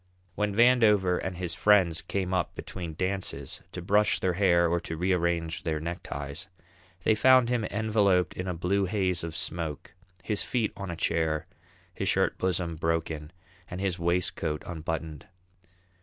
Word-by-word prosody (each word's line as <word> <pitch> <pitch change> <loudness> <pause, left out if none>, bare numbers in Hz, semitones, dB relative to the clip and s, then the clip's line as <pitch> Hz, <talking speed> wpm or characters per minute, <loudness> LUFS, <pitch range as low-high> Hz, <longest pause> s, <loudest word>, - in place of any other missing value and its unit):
When 105 +1 -1
Vandover 110 -6 +4
and 95 -2 -4
his 90 -2 -2
friends 95 -6 +4
came 95 -2 -2
up 90 - -1
between 85 -4 -6
dances, 90 -7 -3
to 90 - -6
brush 105 +4 +3
their 90 - +1
hair 85 -2 +4
or 85 +1 +1
to 85 -2 -6
rearrange 85 -2 0
their 80 -2 -2
neckties, 80 -1 -6 0.6
they 110 - +4
found 130 +2 +5
him 120 -3 0
enveloped 105 -4 +2
in 90 - -5
a 90 - -1
blue 95 +4 +1
haze 95 -3 0
of 85 -1 -5
smoke, 80 -3 -4 0.3
his 105 -2 0
feet 120 -4 -1
on 100 -2 -6
a 85 - -3
chair, 80 -2 0 0.5
his - - -1
shirt - - +1
bosom 90 -3 -1
broken, 80 -2 -2 0.4
and 90 - -5
his 95 -2 -1
waistcoat 85 -3 -1
unbuttoned. 80 -2 -5
90 Hz, 155 wpm, -28 LUFS, 80-100 Hz, 0.6 s, found